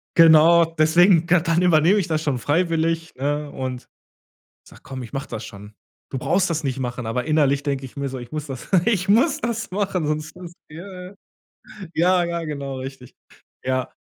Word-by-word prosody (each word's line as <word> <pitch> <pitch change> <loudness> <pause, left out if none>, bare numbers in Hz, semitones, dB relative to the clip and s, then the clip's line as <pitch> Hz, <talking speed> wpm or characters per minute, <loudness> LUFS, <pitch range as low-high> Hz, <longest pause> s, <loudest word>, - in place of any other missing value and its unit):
genau, 165 +1 +7
deswegen 165 +2 +4
ka 175 0 +4
dann 165 +1 +1
übernehme 175 +4 +4
ich 180 - -2
das 155 -1 -1
schon 145 -5 0
freiwillig, 165 +3 0
ne? 145 +2 -2
Und 130 -2 -6 0.8
sag: - - -17
„Komm, 130 -1 -7
ich 115 - -10
mach 140 0 -4
das 110 - -6
schon. 105 -1 -11 0.4
Du 135 - -2
brauchst 185 +8 +1
das 160 -1 -1
nicht 135 -1 -2
machen.” 125 -2 -4
Aber 125 +2 -2
innerlich 145 -3 +2
denke 140 -2 -2
ich 130 - -16
mir 140 0 -3
so: 130 0 -6
„Ich 120 - -10
muss 155 -1 -4
das 135 -3 -8 0.2
ich 200 -5 0
muss 275 +9 +3
das 235 -5 -3
machen, 190 -5 -1
sonst 155 +2 -3
ist 175 -1 -10 0.2
der“ 180 +3 -10 0.8
Ja, 180 +2 +3
ja, 170 0 -3
genau, 140 -3 -5
richtig. 130 -1 -9 0.5
Ja, 130 -1 -2
155 Hz, 185 wpm, -22 LUFS, 135-175 Hz, 0.8 s, genau